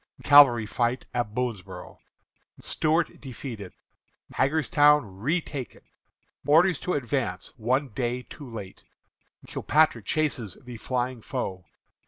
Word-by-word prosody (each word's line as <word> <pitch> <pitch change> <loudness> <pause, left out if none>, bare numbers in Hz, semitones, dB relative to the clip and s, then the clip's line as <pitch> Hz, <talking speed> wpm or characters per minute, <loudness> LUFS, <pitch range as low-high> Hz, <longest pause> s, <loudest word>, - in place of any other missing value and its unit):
Cavalry 140 -6 +7
Fight 120 +3 -1
at 120 -3 -2
Boonsboro'. 120 -7 -5 0.6
Stuart 160 +1 0
Defeated. 120 -7 -8 0.6
Hagerstown 150 0 +3
Retaken. 145 - -3 0.6
Orders 170 +5 +4
to 180 - -2
Advance, 120 -8 -2
One 130 +4 0
Day 125 +2 -3
Too 140 0 -11
Late. 105 -5 -9 0.6
Kilpatrick 150 -8 +1
Chases 135 - -1
the 125 -2 -9
Flying 125 0 -3
Foe. 95 -8 -4
125 Hz, 100 wpm, -26 LUFS, 115-145 Hz, 0.6 s, Cavalry